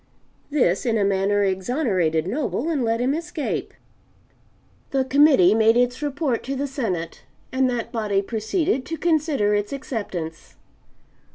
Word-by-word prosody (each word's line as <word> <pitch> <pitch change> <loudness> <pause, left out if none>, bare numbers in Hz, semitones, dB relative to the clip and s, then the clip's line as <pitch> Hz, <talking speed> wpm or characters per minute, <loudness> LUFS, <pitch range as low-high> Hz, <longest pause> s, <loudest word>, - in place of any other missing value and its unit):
This 250 -11 +1
in 230 -3 +1
a 205 - +2
manner 200 +1 +2
exonerated 190 - 0
Noble 265 - -2
and 295 -6 0
let 230 0 0
him 255 +3 +1
escape. 325 -1 -3 1.2
The 270 -1 0
Committee 265 - +5
made 225 +1 +4
its 245 +2 +1
report 285 -4 -1
to 275 +2 -3
the 275 +2 -2
Senate, 220 - -3 0.3
and 260 0 +2
that 240 -2 -3
body 205 -3 0
proceeded 255 - -1
to 325 - -4
consider 305 -11 +1
its 205 0 -1
acceptance. 200 - -5
240 Hz, 135 wpm, -23 LUFS, 200-280 Hz, 1.2 s, Committee